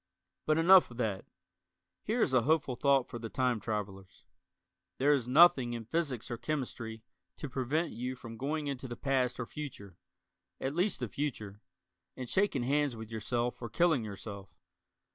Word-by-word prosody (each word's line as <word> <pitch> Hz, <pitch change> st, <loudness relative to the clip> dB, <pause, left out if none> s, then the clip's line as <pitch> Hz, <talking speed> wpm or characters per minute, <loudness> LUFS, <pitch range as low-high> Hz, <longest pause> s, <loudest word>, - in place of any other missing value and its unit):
But 155 Hz, 0 st, +3 dB
enough 180 Hz, +3 st, +7 dB
of 120 Hz, -, -12 dB
that. 110 Hz, -6 st, -2 dB, 0.8 s
Here 225 Hz, +2 st, +1 dB
is 130 Hz, -, 0 dB
a 130 Hz, -, +5 dB
hopeful 140 Hz, -1 st, +1 dB
thought 135 Hz, 0 st, +3 dB
for 120 Hz, -, -7 dB
the 115 Hz, -1 st, -6 dB
time 125 Hz, -2 st, +1 dB
travelers. 100 Hz, -3 st, -5 dB, 0.7 s
There 140 Hz, +3 st, +3 dB
is 130 Hz, -5 st, 0 dB
nothing 130 Hz, -4 st, +6 dB
in 115 Hz, -1 st, -5 dB
physics 140 Hz, -4 st, -2 dB
or 120 Hz, -, -4 dB
chemistry 115 Hz, -4 st, -4 dB, 0.3 s
to 150 Hz, -, -5 dB
prevent 140 Hz, +6 st, -1 dB
you 125 Hz, +3 st, -4 dB
from 115 Hz, -2 st, -9 dB
going 150 Hz, +5 st, -2 dB
into 135 Hz, -2 st, -4 dB
the 120 Hz, -1 st, -7 dB
past 130 Hz, -3 st, 0 dB
or 125 Hz, -, -2 dB
future 115 Hz, -, -8 dB, 0.6 s
at 135 Hz, -, -2 dB
least, 180 Hz, -1 st, 0 dB
the 125 Hz, -, -1 dB
future 105 Hz, -5 st, -4 dB, 0.6 s
and 125 Hz, -, -5 dB
shaking 190 Hz, -6 st, +1 dB
hands 140 Hz, 0 st, +1 dB
with 110 Hz, 0 st, -9 dB
yourself 120 Hz, +3 st, -2 dB
or 120 Hz, -, -5 dB
killing 160 Hz, -3 st, +2 dB
yourself. 100 Hz, -2 st, -8 dB
125 Hz, 165 wpm, -32 LUFS, 115-145 Hz, 0.8 s, enough